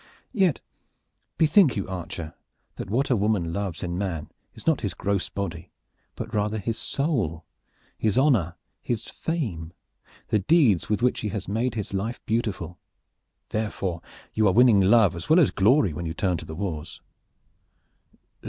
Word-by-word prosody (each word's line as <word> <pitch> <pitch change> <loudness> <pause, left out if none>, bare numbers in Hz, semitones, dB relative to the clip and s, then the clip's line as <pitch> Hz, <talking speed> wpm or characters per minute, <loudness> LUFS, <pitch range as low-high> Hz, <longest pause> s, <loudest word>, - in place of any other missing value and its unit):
"Yet, 190 - +2 0.8
bethink 160 - +5
you, 100 - -2
archer, 85 -3 -6 0.4
that - - -6
what 130 +6 +1
a - - +5
woman 100 -6 0
loves 95 -4 -3
in 85 0 -3
man 85 -7 -3 0.2
is - - -12
not - - +2
his - - -2
gross 100 -2 -1
body, 90 -3 -5 0.5
but - - -6
rather 105 +1 0
his 110 +2 -2
soul, 115 - -1 0.5
his 110 -1 +1
honor, 120 - +3 0.3
his 115 -2 -3
fame, 100 - -4 0.6
the 110 - +3
deeds 115 - +3
with 105 +2 0
which 125 - +2
he 105 - -2
has 100 -2 -4
made 115 +4 -1
his 105 -3 -4
life 105 +5 -2
beautiful. 105 -7 -2 0.7
Therefore 100 -5 -2 0.3
you 110 -1 +3
are 95 - +3
winning 115 -2 +6
love 100 -2 +5
as 85 - -7
well 160 +3 +6
as 155 - +4
glory 105 - +3
when 85 +2 -4
you 80 - -4
turn 90 -1 0
to 80 - -8
the 80 - -7
wars." 85 -4 -5
100 Hz, 160 wpm, -25 LUFS, 85-120 Hz, 0.8 s, winning